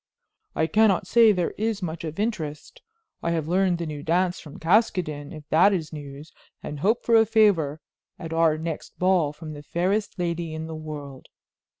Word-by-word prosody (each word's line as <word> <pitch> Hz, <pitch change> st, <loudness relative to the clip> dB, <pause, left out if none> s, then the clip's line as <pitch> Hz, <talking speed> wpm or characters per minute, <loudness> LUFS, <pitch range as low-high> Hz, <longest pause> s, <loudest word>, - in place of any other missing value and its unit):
"I 160 Hz, -, +2 dB
cannot 210 Hz, +1 st, +3 dB
say 230 Hz, -2 st, +6 dB
there 180 Hz, -4 st, -1 dB
is 215 Hz, -2 st, -1 dB
much 165 Hz, -1 st, -4 dB
of 160 Hz, +2 st, -6 dB
interest. 165 Hz, -9 st, -4 dB, 0.4 s
I -, -, -1 dB
have 160 Hz, -2 st, -2 dB
learned 180 Hz, 0 st, +2 dB
the 170 Hz, -, -4 dB
new 150 Hz, -2 st, -6 dB
dance 175 Hz, +4 st, +1 dB
from 150 Hz, -, -11 dB
Caskoden, 165 Hz, -6 st, +1 dB
if 155 Hz, -2 st, -10 dB
that 180 Hz, +6 st, +5 dB
is 165 Hz, -4 st, -3 dB
news, 145 Hz, 0 st, -9 dB, 0.3 s
and 150 Hz, -1 st, -6 dB
hope 215 Hz, +9 st, +1 dB
for 230 Hz, -, +4 dB
a 225 Hz, -, +7 dB
favor 200 Hz, -9 st, +2 dB, 0.4 s
at 165 Hz, -2 st, -7 dB
our 165 Hz, -1 st, +3 dB
next 160 Hz, -1 st, -6 dB
ball 180 Hz, -5 st, +2 dB
from 155 Hz, +1 st, -9 dB
the 145 Hz, -, -9 dB
fairest 190 Hz, +7 st, -1 dB
lady 170 Hz, -2 st, -2 dB
in 160 Hz, 0 st, -5 dB
the 160 Hz, -, -7 dB
world." 150 Hz, -4 st, -8 dB
165 Hz, 185 wpm, -25 LUFS, 155-190 Hz, 0.4 s, a